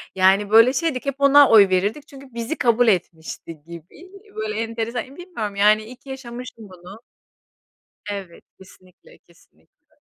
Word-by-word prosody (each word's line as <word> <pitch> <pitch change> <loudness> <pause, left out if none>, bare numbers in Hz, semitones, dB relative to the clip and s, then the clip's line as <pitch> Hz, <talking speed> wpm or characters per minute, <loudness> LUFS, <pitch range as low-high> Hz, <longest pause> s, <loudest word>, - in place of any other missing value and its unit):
Yani, 190 +2 +3
böyle 230 +4 +6
şeydik, 300 -5 -2
hep 275 -1 -2
ona 280 0 +6
oy 205 -4 +6
verirdik 205 +11 -1
çünkü 275 -3 -15
bizi 235 +7 -4
kabul 240 0 +2
etmişti 165 -4 -3
gibi. 170 - -13 0.2
Böyle, 215 -1 -4
enteresan, 230 +3 -5
bilmiyorum 280 - -6
yani, 210 +2 +3
iyi 250 +3 -11
ki 270 - -18
yaşamıştım 245 -3 -9
bunu. 185 +5 -14 1.1
Evet, 195 -4 -8
kesinlikle, 185 -1 -20
kesinlikle. 80 - -29
220 Hz, 135 wpm, -21 LUFS, 190-255 Hz, 1.1 s, böyle